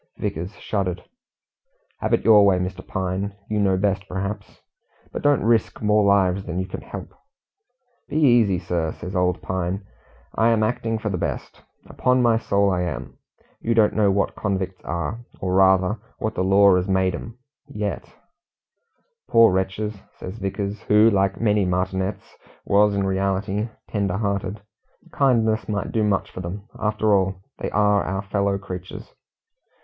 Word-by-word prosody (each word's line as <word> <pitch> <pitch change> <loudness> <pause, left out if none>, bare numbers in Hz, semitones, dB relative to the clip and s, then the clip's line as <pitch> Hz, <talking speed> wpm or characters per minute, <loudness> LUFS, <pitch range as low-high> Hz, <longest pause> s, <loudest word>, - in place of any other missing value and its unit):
Vickers 90 +6 -4
shuddered. 95 -4 -3 1.0
"Have - - -2
it - - +1
your 105 -2 +7
way, 100 -2 +4
Mr. 90 0 -4
Pine; 95 +2 -3 0.2
you 105 - +1
know 95 -2 +2
best 100 0 0
perhaps. 100 +2 -5 0.5
But - - -5
don't 145 -1 +3
risk 115 0 +1
more 105 0 +3
lives 100 -1 +3
than 85 -2 -5
you 95 - -1
can 95 - -7
help." - - -9 1.0
"Be - - -6
easy, 120 - +4
sir," 85 -2 -2
says 95 +2 -8
old 90 -1 0
Pine; 95 +2 -3 0.5
"I 115 +1 +3
am 115 -2 +2
acting 115 0 -1
for 110 -1 -3
the 90 -3 -2
best; - - -4 0.2
upon 125 0 +1
my 115 -2 +3
soul 100 -3 +1
I 90 -1 0
am. 90 - -5 0.4
You 115 0 0
don't 110 -2 +4
know 105 -2 +3
what 100 +1 +1
convicts 95 -2 -3
are, 85 +6 -3 0.2
or 90 0 -2
rather 95 +2 +4 0.2
what 110 - -2
the 95 - -1
law 100 0 +5
has 90 +1 -1
made 95 -1 +1
'em 115 +6 -7 0.3
yet 105 -7 -4 0.6
" 465 0 -47
"Poor 115 -4 +6
wretches!" 95 +3 -1 0.2
says 95 +5 -8
Vickers, 100 +1 -3
who, 105 +2 +5
like 95 -1 +1
many 105 -2 +2
martinets, 95 +2 -2 0.3
was 100 0 +3
in 100 -1 0
reality 95 +3 -1 0.2
tender 100 -3 -1
hearted. 100 -1 -2 0.5
"Kindness 110 -6 +2
might 105 -1 -2
do 110 - +1
much 100 -2 0
for 90 - -7
them. 95 +4 -6 0.2
After 105 0 +1
all, 95 -1 +2 0.2
they - - -3
are 105 -1 +3
our 95 +1 -3
fellow 100 0 0
creatures." 95 - -8
100 Hz, 160 wpm, -23 LUFS, 95-105 Hz, 1.0 s, your